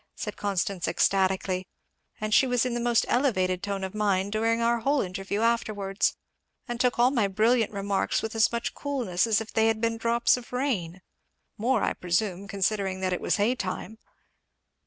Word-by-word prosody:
said - - -5
Constance 195 -2 -2
ecstatically; 190 +1 +1 0.5
"and 215 0 -2
she 265 - +5
was 245 -1 +1
in 250 - -1
the 240 - -1
most 240 -1 +2
elevated 185 -9 +1
tone 200 -1 -3
of 190 - -4
mind 200 -2 0
during 225 +2 +1
our 235 0 +2
whole 280 +5 +1
interview 195 +1 -3
afterwards, 210 -4 0 0.5
and 240 -1 -4
took 250 -1 +2
all 245 +2 +4
my 230 -7 +2
brilliant 220 +3 +2
remarks 200 -1 -1
with 220 - -3
as 225 +1 +3
much 235 0 -2
coolness 235 -10 -1
as 220 -1 +2
if 225 - -8
they 220 0 +3
had 225 -1 +1
been 230 0 0
drops 235 +2 +2
of 245 - -11
rain 195 -10 -2 0.5
more, 245 +5 +1
I - - +1
presume, 180 +2 -1
considering 195 -1 -1
that 185 -1 0
it 180 - -3
was - - +1
hay 210 +4 +2
time." 220 0 -5
215 Hz, 180 wpm, -27 LUFS, 195-235 Hz, 0.5 s, she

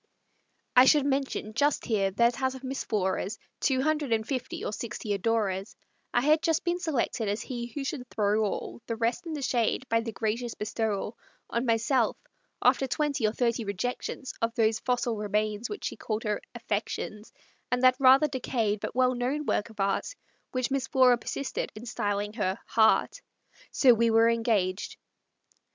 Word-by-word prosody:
I 250 - +9
should 290 0 +5
mention 270 -6 -1
just 285 +5 +1
here, 200 -5 +1
that 235 +6 +2
out 260 0 0
of 265 - -10
Miss 265 +1 -3
Flora's 195 -1 -1 0.2
Two 265 -2 +1
hundred 300 -3 0
and 220 0 +1
fifty 255 -2 -3
or - - -3
sixty 220 -2 -4
adorers, 200 -2 -1 0.4
I 240 - +2
had 305 +4 +4
just 325 -1 +1
been 345 0 0
selected 275 - -1
as 210 +3 -2
he 240 -2 -5
who 275 +4 -5
should 265 -3 -5
throw 210 +1 +1
all 210 +3 -3
The 230 - -2
rest 235 +10 -1
in 325 - -4
the 290 -2 -4
shade, 245 +1 0
by 230 - +3
the 225 0 -4
gracious 225 +3 -2
bestowal 210 0 -2 0.3
On 235 +2 -1
myself, 230 +1 +2 0.5
after 270 - +4
twenty 285 -3 0
or - - +1
thirty 235 0 0
rejections, 245 +6 -4
Of 230 0 0
those 220 -2 +2
fossil 245 -2 0
remains 210 +2 -1
which 415 - -6
she - - -4
called 215 0 -3
her 210 -2 -1
"affections," 210 -1 -4 0.4
And 250 +1 +1
that 255 0 +6
rather 270 +3 +7
decayed 235 -6 -1
but - - -5
well 255 0 +3
known 260 +5 -2
work 210 - 0
of 220 -2 -16
art 195 - 0 0.4
Which 255 0 -1
Miss 275 -1 0
Flora 255 -3 +5
persisted 275 +3 -4
in 215 +3 -9
styling 205 -3 -2
her 195 -4 -1
"heart." 220 - +3 0.5
So 255 -3 +5
we 230 0 +2
were 225 +1 +5
engaged. 210 -5 0
235 Hz, 175 wpm, -28 LUFS, 215-260 Hz, 0.5 s, I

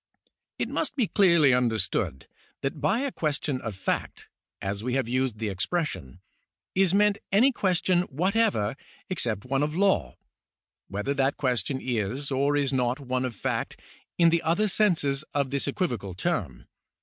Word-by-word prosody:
It - - -1
must - - -2
be 255 -6 +2
clearly 170 - +5
understood 110 - 0 0.4
that 135 +1 -3
by 190 - +2
a 280 -1 -1
question 145 - -1
of 110 -4 -5
fact, 95 - -3 0.3
as 100 +2 -4
we 125 +1 -1
have 135 -3 0
used 130 -2 0
the 110 -1 -2
expression, 105 - -3 0.5
is 190 -2 +3
meant 205 +1 +3
any 235 +8 +5
question 185 -5 +2
what 180 +9 0
ever 195 - +2 0.4
except 115 - -1
one 135 +1 0
of 150 +1 -1
law, 170 - +2 0.7
whether 105 +8 -2
that 135 0 +1
question 130 0 0
is, 125 +3 -2
or 140 +2 +2
is 140 -1 0
not. 125 +1 +1
one 130 -1 -2
of 125 -3 -4
fact - - -3 0.4
in 170 -1 +6
the 165 0 +2
other 170 +6 +1
senses 165 -9 +1
of 140 -2 0
this 140 0 -1
equivocal 120 - -2
term. 90 - -2
140 Hz, 160 wpm, -27 LUFS, 120-175 Hz, 0.7 s, in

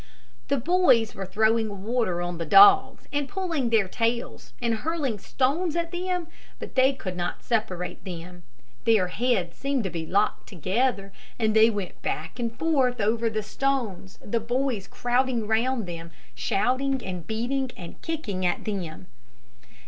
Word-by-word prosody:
The 280 - +1
boys 255 -6 +3
were 195 -1 -6
throwing 220 0 +1
water 220 -6 0
on 175 -1 -4
the 165 - -2
dogs, 395 0 +7
and 285 -1 -1
pulling 335 -10 -1
their 220 -4 +3
tails, 235 +4 -2
and 230 -2 0
hurling 285 -6 -2
stones 305 - 0
at 335 -1 -1
them, 360 -1 -2 0.3
but - - -8
they 260 +1 +5
could 190 -9 -6
not 175 -1 -3
separate 185 -6 -2
them. 175 -1 -8 0.4
Their 215 -6 +4
heads 200 -6 0
seemed 265 - -1 0.2
locked 200 +2 +1
together, 195 - -1 0.2
and 220 -2 +1
they 220 +1 +7
went 205 -5 -5
back 160 +10 -4
and 235 -1 -1
forth 270 -6 +2
over 225 +2 +1
the 215 -1 -2
stones, 215 -5 -2
the 230 +3 0
boys 240 -2 -1
crowding 245 -1 0
around 225 +2 +1
them, 170 -1 -7 0.2
shouting, 265 +5 0
and 180 -3 -5
beating, 250 +4 -1
and 170 -2 -10
kicking 245 - -3
at 175 -1 0
them. 185 -5 -4
230 Hz, 150 wpm, -26 LUFS, 195-265 Hz, 0.4 s, dogs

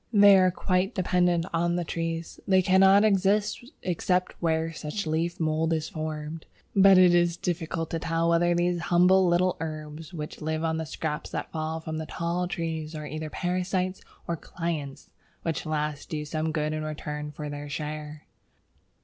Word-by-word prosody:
They 205 -2 +8
are 185 0 +5
quite 185 +1 0
dependent 180 -2 +2
on 170 +1 +1
the 175 - 0
trees; 165 0 -4
they 190 -1 +4
cannot 190 +2 +6
exist 205 0 +2 0.2
except 180 +1 0
where 165 -1 0
such 160 +6 -4
leaf 165 +3 -1
mould 160 0 +1
is 160 -1 -2
formed. 155 0 -5 0.3
But 195 -1 +7
it 180 -1 +7
is 175 -1 +3
very - - -35
difficult 165 -1 -4
to 165 - -1
tell 165 +1 0
whether 170 +1 +3
these 175 0 +1
humble 180 +2 +4
little 180 +1 +2
herbs 155 0 -6
which 155 -4 -7
live 155 +1 -2
on 160 -1 0
the 160 -1 -4
scraps 155 -1 -4
that - - -5
fall 160 0 -3
from 160 0 -4
the 160 - -5
tall 170 +2 -2
trees 165 -2 -4
are 150 -1 -5
either 155 +1 -5
parasites 185 +2 -1 0.3
or 170 - 0
clients, 155 -4 -5 0.3
which 165 -1 -2
last 150 -1 -2
do 150 -1 -3
some 155 +1 -2
good 155 -1 -1
in 155 - -2
return 150 -1 -5
for 150 0 -6
their 145 0 -6
share. 150 0 -5
165 Hz, 175 wpm, -27 LUFS, 155-180 Hz, 0.3 s, They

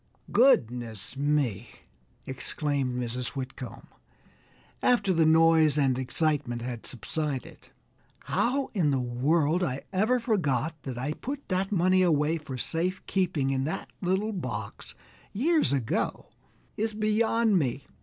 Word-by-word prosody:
"Goodness 120 - +2
me!" 135 -7 0 0.6
exclaimed 130 -1 -2
Mrs. 125 +2 -3
Whitcomb, 130 -2 -7 1.0
after 240 -6 +3
the 165 -2 +3
noise 160 -2 +5
and 135 -3 +3
excitement 130 -2 -1
had 120 -2 -5
subsided, 140 +2 -4 0.5
"how 265 +3 0
in 175 -9 +2
the 140 - +2
world 145 +7 +1
I 135 -4 -2
ever 220 +7 +2
forgot 165 - 0
that 130 -3 -5
I 135 +5 -2
put 280 - -6
that 190 +1 0
money 185 0 +3
away 160 -2 +2
for 140 -4 -7
safe 175 +8 -2
keeping 170 -8 0
in 135 -1 0
that 155 - -4
little 190 +4 0
box 185 - -6 0.4
years 305 - +2
ago 135 -5 -1 0.5
is 215 0 -2
beyond 215 -1 +2
me. 135 -2 -2
155 Hz, 125 wpm, -28 LUFS, 130-190 Hz, 1.0 s, noise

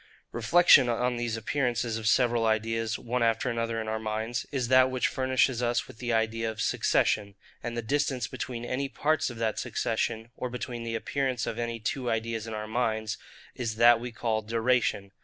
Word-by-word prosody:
Reflection 130 +2 +5
on 125 +1 0
these 120 -1 -2
appearances 120 -1 -1
of 110 -1 -3
several 120 0 +3
ideas 115 +1 0
one 125 +1 -2
after 115 +2 +1
another 115 -1 -2
in 110 - -4
our 110 0 -2
minds, 110 +1 -3
is 130 -4 -1
that 130 +1 +5
which 130 -1 +1
furnishes 130 -1 +1
us 120 0 0
with 110 - -14
the 120 -1 -2
idea 115 0 0
of 110 -1 -7
SUCCESSION: 100 -1 +1 0.3
and 120 0 -4
the 120 - -2
distance 130 -1 0
between 120 -1 -5
any 135 +3 -2
parts 155 +2 0
of 120 - -8
that 110 -1 -1
succession, 115 0 -2
or 125 - -4
between 120 -1 -5
the 115 0 -3
appearance 130 +1 -1
of 115 - -4
any 115 -1 -3
two 125 +3 -2
ideas 115 0 -2
in 110 - -5
our 105 0 -4
minds, 110 -2 -1 0.3
is 115 -3 -3
that 120 +1 +6
we 120 +1 -6
call 115 -1 -1
DURATION. 115 -2 0
115 Hz, 190 wpm, -28 LUFS, 110-125 Hz, 0.3 s, that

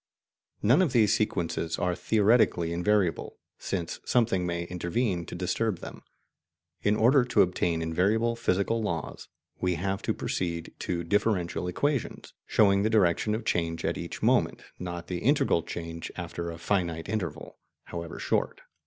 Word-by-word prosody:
None 125 - +5
of 170 -8 +1
these 110 -4 +4
sequences 85 -5 -1
are 90 0 0
theoretically 105 -5 +2
invariable, 90 -1 0 0.2
since 85 -4 -3
something 110 -7 +1
may 85 0 -2
intervene 90 +1 -2
to - - -7
disturb 95 +3 -1
them. - - -9 0.8
In 105 +1 +2
order 125 +5 +5
to 125 - +4
obtain 85 -2 0
invariable 105 +8 +1
physical 115 0 0
laws, 85 -8 -4 0.3
we 90 -1 +1
have 95 +3 -2
to - - 0
proceed 85 -2 -3
to 85 -1 -2
differential 90 -1 0
equations, 140 +9 -2
showing 100 -2 +4
the 110 - +2
direction 105 0 +2
of 110 0 -5
change 85 -4 -1
at - - 0
each - - -6
moment, - - +2 0.2
not 85 -1 -5
the 90 -1 -4
integral 135 - +3
change 85 0 -6
after 85 0 -5
a 85 - -6
finite 85 -2 -1
interval, 85 -7 -4 0.2
however 85 -1 -7
short. - - -1
90 Hz, 145 wpm, -28 LUFS, 85-110 Hz, 0.8 s, None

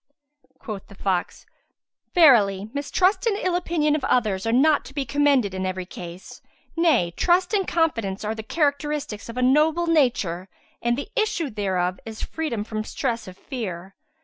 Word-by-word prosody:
'" 265 -2 -38
Quoth 210 -5 -6
the 200 - -14
fox, 190 -2 -2 0.7
"Verily 215 - +5
mistrust 365 +10 +1
and 415 -3 +1
ill 365 -4 0
opinion 325 -4 +1
of 300 - -3
others 215 -6 +1
are - - +2
not 290 +5 +4
to 270 - -12
be 280 -2 -1
commended 275 -5 +2
in 190 0 -3
every 185 0 -3
case; 175 +1 -10 0.3
nay 305 - +3
trust 360 +3 +2
and 390 -3 +1
confidence 230 - 0
are 215 - -1
the 220 - -6
characteristics 285 -4 -1
of 230 - -7
a 250 - +1
noble 305 +6 +3
nature 235 - +1 0.3
and 240 +1 +1
the 285 - -5
issue 340 -9 0
thereof 185 -3 -1
is 220 -1 -8
freedom 300 -10 -3
from 215 0 -4
stress 230 +1 -3
of 185 0 -10
fear. 195 - -6
250 Hz, 170 wpm, -24 LUFS, 200-310 Hz, 0.7 s, Verily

